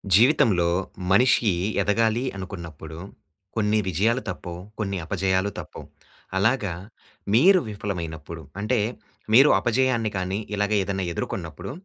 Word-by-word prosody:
జీవితంలో 105 - +4 0.4
మనిషి 115 0 +4 0.3
ఎదగాలి 110 +4 +1
అనుకున్నప్పుడు, 85 -4 -8 0.6
కొన్ని 110 -1 +2
విజయాలు 110 +8 +1
తప్పవు, 90 -1 -6 0.2
కొన్ని 100 -2 -2
అపజయాలు 95 +2 0
తప్పవు. - - -9 0.5
అలాగ 110 +4 +2 0.7
మీరు 185 +10 +6
విఫలమైనప్పుడు, 85 -6 -5 0.2
అంటే 115 +3 +1 0.6
మీరు 135 +4 +8
అపజయాన్ని 120 -2 +1
కానీ 95 +2 -2 0.2
ఇలాగ 105 +1 0
ఏదైనా 95 -1 -2
ఎదుర్కొన్నప్పుడు 90 +2 -5
100 Hz, 100 wpm, -24 LUFS, 90-115 Hz, 0.7 s, మీరు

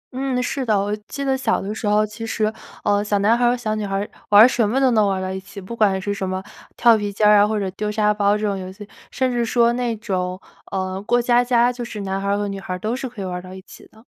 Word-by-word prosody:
嗯， 260 -1 -1
是 270 +1 -2
的， 215 -5 +2
我 205 +1 -1
记 280 -1 -5
得 270 -1 +2
小 265 - 0
的 200 +2 -4
时 215 -1 -4
候， 210 +1 +3
其 215 +2 -9
实， 220 -1 -1 0.3
呃， 205 0 +2
小 205 -1 0
男 210 +4 +3
孩 240 0 +1
儿 - - +5
和 245 - +1
小 215 -3 -2
女 215 - -2
孩 195 -1 -3
儿 200 +1 -2 0.2
玩 210 +3 +9
什 235 -4 +1
么 260 +5 +1
都 265 -2 +3
能 215 -3 +3
玩 195 -1 0
儿 185 - -4
到 185 - -3
一 190 - -4
起， 200 +1 -11
不 195 +5 -8
管 200 -4 +2
是 200 +2 -2
什 190 -2 -3
么 185 0 -3 0.4
跳 235 -2 +6
皮 205 -1 -2
筋 205 +1 0
儿 210 0 +7
啊 205 - +5
或 215 -1 -1
者 195 - -2
丢 210 +2 -3
沙 210 0 +2
包 205 0 +2
这 215 - -3
种 200 - 0
游 185 -1 -6
戏， 205 +1 -11 0.2
甚 260 -2 -1
至 240 -1 0
说 235 0 +2
那 240 -2 -1
种， 185 -3 -3 0.3
呃， 190 0 -3
过 240 +3 +1
家 240 0 +3
家 245 0 +3
就 245 - -6
是 215 -3 -6
男 195 0 -3
孩 200 - -3
儿 200 0 +1
和 205 - -2
女 195 -1 -5
孩 185 -1 -5
儿 - - -5
都 220 +5 -2
是 260 -1 -5
可 210 -5 -7
以 - - -4
玩 180 - -4
儿 180 - -4
到 185 +1 -11
一 190 - -10
起 - - -15
的。 220 +2 -20
210 Hz, 335 characters per minute, -21 LUFS, 195-235 Hz, 0.4 s, 玩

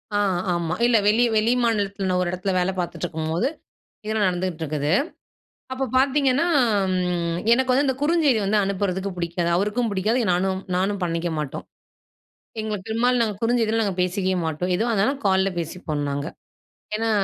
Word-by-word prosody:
ஆ, - - +3 0.4
ஆமா. 170 -1 -1
இல்ல, 240 -1 +4
வெளி 220 +3 +4
வெளி 220 +3 +3
மாநிலத்தில 200 -4 0
நான் 180 0 +1
ஒரு 175 - -2
இடத்துல 185 +2 -2
வேலை 180 +1 +1
பார்த்திட்டுருக்கும்போது, 170 +2 -2 0.6
இதெல்லாம் 215 -1 +1
நடந்துக்கிட்டு 180 -2 -2
இருக்குது. 150 0 -1 0.8
அப்ப 260 +1 -1
பார்த்தீங்கன்னா, 275 +2 +3 0.5
ம் 175 -2 -1
எனக்கு 260 +2 +3
வந்து 270 +3 +3
அந்த 265 - +1
குறுஞ்செய்தி 300 -5 +3
வந்து 205 +2 +2
அனுப்புறதுக்கு 195 0 -2
பிடிக்காது. 170 0 -1
அவருக்கும் 210 +5 0
பிடிக்காது. 210 +5 +1
எ - - -2
நானும் 190 +1 0 0.2
நானும் 195 +2 0
பண்ணிக்க 170 0 -2
மாட்டோம். 150 -3 -4 1.0
எங்களுக்கு 210 -2 -4
பெரும்பாலும் 240 +2 +2
நாங்க 215 -3 -1
குறுஞ்செய்தில 225 -1 +2
நாங்க 200 -3 -1
பேசிக்கவே 185 +1 0
மாட்டோம். 160 +3 -2
எதுவா 230 +5 0
இருந்தாலும் 245 +7 +1
கால்ல 190 0 +3
பேசிப்போம் 160 -3 -3
நாங்க. 140 +1 -3 0.7
ஏன்னா 225 +1 -1
195 Hz, 155 wpm, -23 LUFS, 175-230 Hz, 1.0 s, இல்ல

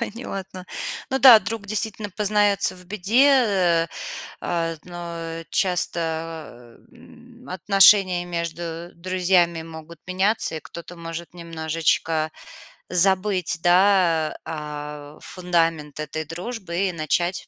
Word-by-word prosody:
Понятно. 195 -5 -6 0.4
Ну 265 - +1
да, 255 -5 +10
друг 225 -1 -5
действительно 215 -1 -3
познается 205 -1 +1
в 180 0 -15
беде, 210 +8 +3
э, 185 -10 +3 0.5
а, 165 -1 -1
вот, 155 - -13
но 170 -2 -6
часто, 165 - -3 0.2
эм, 245 +1 -17
отношения 190 -1 +4
между 170 0 -5
друзьями 175 -1 +1
могут 160 0 -11
меняться, 190 -1 0
и - - -5
кто-то 170 +1 -10
может 165 0 -7
немножечко 160 -1 -1 0.6
забыть, 185 -2 +2
да, 175 -3 +3
а, 150 -1 -7
фундамент 165 -5 -1
этой 155 +1 -4
дружбы 185 +1 -3
и - - -2
начать 175 +2 -1
175 Hz, 105 wpm, -23 LUFS, 165-195 Hz, 0.6 s, да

